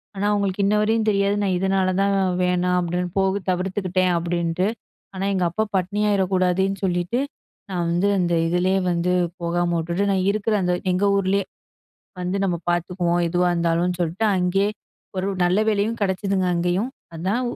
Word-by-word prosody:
ஆனா 195 +1 -2
அவங்களுக்கு 200 -1 0
இன்னவரையும் 210 +2 +2
தெரியாது. 200 0 +2
நான் 190 -2 +1
இதனால 190 0 +1
தான், 200 0 +2 0.3
வேணாம் 180 0 +1
அப்படின்னு 175 +1 -2
போக 190 +1 +1
தவிர்த்துக்கிட்டேன் 185 0 0
அப்படின்ட்டு. 170 +1 -1 0.5
ஆனா 190 +1 -2
எங்க 185 -2 0
அப்பா 215 +6 -1
பட்டினியாயிர 200 +2 +1
கூடாதுன்னு 190 +1 +1
சொல்லிட்டு 175 +5 0 0.5
நான் 175 -2 -1
வந்து 175 +4 +1
அந்த 175 -1 +1
இதுலயே 180 +3 +1
வந்து 175 +1 0 0.3
போகாமவுட்டுட்டு, 170 +1 -1
நான் 190 -1 +1
இருக்கிற 215 +1 0
அந்த 180 0 +1 0.2
எங்க 185 +2 +1
ஊர்லயே 195 0 +1 0.8
வந்து 180 +2 -2
நம்ம 180 -3 0
பார்த்துக்குவோம், 175 0 0
எதுவா 175 +1 +1
இருந்தாலும் 170 +1 +1
சொல்ட்டு. 175 +5 -1
அங்கயே, 185 +2 +1 0.5
ஒரு 185 +1 -1 0.2
நல்ல 180 +3 +3
வேலையும் 215 +2 0
கிடைச்சுதுங்க 190 -1 0
அங்கயும். 175 +7 0 0.3
அதான் 190 +9 -1
185 Hz, 145 wpm, -22 LUFS, 175-195 Hz, 0.8 s, நல்ல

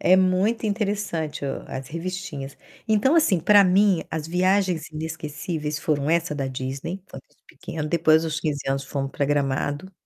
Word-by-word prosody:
É 185 - +5
muito 190 +5 +2
interessante 200 -8 -2
o 135 - -3
as 130 0 -6
revistinhas. 165 -5 -5 0.3
Então, 220 +7 +3
assim, 300 - +4
para 205 +3 +7
mim, 190 -1 +3
as 155 -1 -3
viagens 180 -1 +1
inesquecíveis 155 -1 -4
foram 150 -1 0
essa 170 -2 +1
da 140 -2 -2
Disney, 135 +7 -4
que 195 - -29
foi - - -8
com - - -43
os - - -33
pequenos, 155 -1 -6
depois 160 -1 +4
dos 160 0 -2
15 150 -3 -1
anos 135 0 -1
fomos 135 0 -3
para 140 - 0
Gramado 145 +4 -1
160 Hz, 175 wpm, -24 LUFS, 145-185 Hz, 0.3 s, para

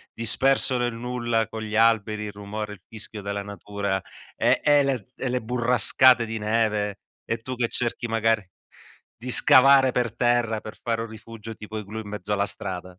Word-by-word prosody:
disperso 130 +3 +3
nel 120 -1 -1
nulla 120 -2 -1
con 110 - -7
gli 110 0 -5
alberi, 110 -1 +2
il 105 - -5
rumore, 105 +1 -6
il 95 - -14
fischio 110 -1 -8
della 100 0 -4
natura 100 -1 -4 0.3
e - - +2
e 145 -1 +5
le 130 -6 -2
e 135 - -3
le 125 0 -1
burrascate 125 +1 +4
di 115 0 -5
neve 105 -2 -1 0.2
e 115 - -2
tu 130 +3 -7
che 120 -1 0
cerchi 120 0 -2
magari 115 -3 0 0.7
di 125 +3 -6
scavare 130 0 +6
per 120 -3 -1
terra 120 -3 +1
per 110 - -10
fare 115 -1 -1
un 115 - -6
rifugio 110 0 -10
tipo 110 0 -8
igloo 105 +2 -6
in 105 - -9
mezzo 105 -1 -5
alla 100 0 +1
strada. 90 -2 -5
110 Hz, 180 wpm, -24 LUFS, 105-120 Hz, 0.7 s, scavare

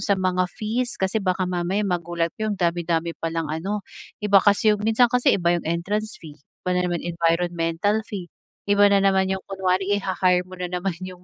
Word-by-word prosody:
sa 200 - +1
mga 185 -1 0
fees 235 +6 -3
kasi 190 +3 0
baka 185 -1 0
mamaya 180 +3 -1
magulat 170 -2 -1
kayo 215 - 0
andami-dami 170 -2 0
palang 165 -1 -2
ano, 195 +5 -3 0.4
iba 200 -1 +6
kasi 205 +2 +4
'yong 210 - -2
minsan 225 +3 +3
kasi 250 0 +3
iba 170 -2 +2
'yong 170 -2 -2
entrance 205 +6 -2
fee, 155 -3 -12 0.3
iba 180 - -1
na 180 0 +1
naman 175 -1 -3
environmental 170 +3 0
fee, 185 -5 -7 0.3
iba 205 0 +5
na 200 -1 +3
naman 190 -1 +3
'yong 190 0 -3
kunwari 195 +1 0
iha-hire 185 -2 +1
mo 185 - -10
na 180 0 -3
naman 180 0 -2
'yong 185 -1 -9
185 Hz, 185 wpm, -23 LUFS, 175-205 Hz, 0.4 s, iba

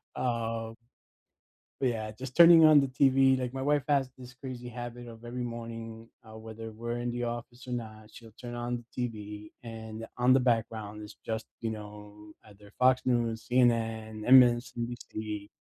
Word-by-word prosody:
um 115 -2 -2 1.1
But, 130 -2 +2
yeah, 110 -2 -4
just 125 +4 -9
turning 170 -1 +9
on 155 -2 +8
the 135 - 0
TV, 135 0 +4
like, 125 0 -3
my 135 - -3
wife 145 -1 +2
has 135 -3 +2
this 125 0 -11
crazy 125 -2 -7
habit 120 0 -7
of 115 0 -12
every 125 +1 -4
morning, 115 -1 -7 0.2
uh, 110 0 -12
whether 110 0 -8
we're 120 +2 -4
in 120 0 -2
the 120 0 -3
office 120 +2 -6
or - - -4
not, 110 -3 -6
she'll 115 -2 -14
turn 120 +2 -8
on 120 0 -3
the 125 -1 0
TV, 105 -1 -9
and 110 -1 -7
on 125 +1 +4
the 130 - +5
background 110 -3 -1
is 105 - -11
just, 110 0 -3
you 115 -1 -2
know, 105 0 -10
either 105 -1 -17
Fox 130 0 +5
News, 115 -3 0
CNN, 115 -3 +1
MSNBC 120 -4 +2
120 Hz, 170 wpm, -29 LUFS, 110-125 Hz, 1.1 s, turning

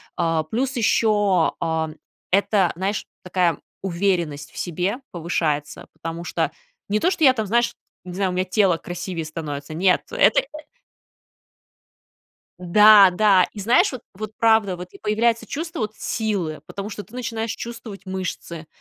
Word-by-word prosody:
А, 165 -1 +1
плюс 250 - -2
ещё, 205 -6 +2
а, 160 -1 -1 0.4
это, 195 -1 +3
знаешь, 195 +4 -2 0.2
такая 180 -4 +1 0.2
уверенность 170 -5 -1
в - - -16
себе 180 +5 -2
повышается, 160 -3 -2
потому 165 +1 -6
что - - -1 0.4
не 210 +1 +1
то, 360 - +3
что 335 - -1
я 260 -3 +7
там, 220 -4 -2
знаешь, 235 +3 +2 0.3
не 180 - -7
знаю, 195 0 0
у - - -3
меня 185 +1 0
тело 185 -3 +2
красивее 175 -1 -5
становится, 155 -2 -6
нет, 180 +3 +3
это 200 - +4
э - - -14 2.1
Да 200 +2 +7
да. 195 -1 +4
И 205 - -8
знаешь, 245 - +3
вот 255 - -7
вот 215 +2 -6
правда, 220 -5 +3
вот 180 +1 -8
и - - -13
появляется 225 +2 +1
чувство 325 +6 -5
вот 215 0 -2
силы, 200 -9 -2
потому 200 +2 -6
что 205 -1 -7
ты 225 - -19
начинаешь 230 -3 -3
чувствовать 230 -4 -8
мышцы. 185 -3 -5
195 Hz, 155 wpm, -22 LUFS, 170-220 Hz, 2.1 s, я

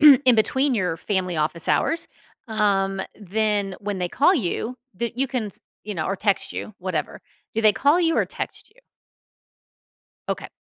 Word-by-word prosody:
in 280 -4 +8
between 260 +5 +2
your 180 -6 0
family, 185 -2 -1
office 155 +2 +1
hours, 330 0 +1 0.4
um, 195 -3 +1
then 205 -1 0
when 205 -1 -3
they 180 -1 -1
call 290 - +4
you, 235 - -2 0.2
that 235 +4 -3
you 270 - +2
can 250 -4 -2
s 200 - -7 0.2
you 210 0 -4
know, 160 -4 -2
or 195 - -1
text 200 0 +1
you, 215 - -6
whatever. 180 -4 -3 0.3
Do 225 - 0
they 215 -1 +6
call 285 - +3
you 330 -2 +2
or - - +3
text - - -6
you? - - -23 1.5
Okay. - - -2
210 Hz, 170 wpm, -23 LUFS, 190-255 Hz, 1.5 s, in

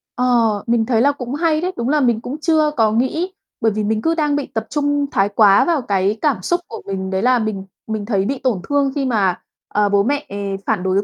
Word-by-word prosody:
Ờ, 250 - 0 0.4
mình 230 -1 +2
thấy 230 -2 +2
là 285 +3 +4
cũng 250 -3 -6
hay 315 -1 +1
đấy, 365 +2 -1
đúng 235 +3 -1
là 300 0 +3
mình 235 -3 +2
cũng 265 +5 -5
chưa 310 -2 +2
có 220 -2 +3
nghĩ, 315 +11 0 0.3
bởi 225 - +3
vì 215 +1 -2
mình 215 +1 0
cứ 325 +5 +1
đang 295 -3 +1
bị 290 - -1
tập 225 - -3
trung 290 -1 0
thái 195 -1 +2
quá 200 -1 +5
vào 330 -6 +1
cái 200 0 0
cảm 295 -3 +1
xúc 350 0 0
của - - -8
mình, 190 -1 -4
đấy 190 0 -1
là 250 +1 +3
mình 215 -3 -3 0.2
mình 215 -2 -3
thấy 200 -4 0
bị 270 +4 -2
tổn 235 -8 -1
thương 280 -1 +2
khi 275 -2 -1
mà, 200 -7 +1 0.3
ờ, 205 0 +2
bố 200 0 +3
mẹ 285 +4 -1 0.4
phản 210 -5 0
đối 190 +2 +1
235 Hz, 245 wpm, -19 LUFS, 205-285 Hz, 0.4 s, quá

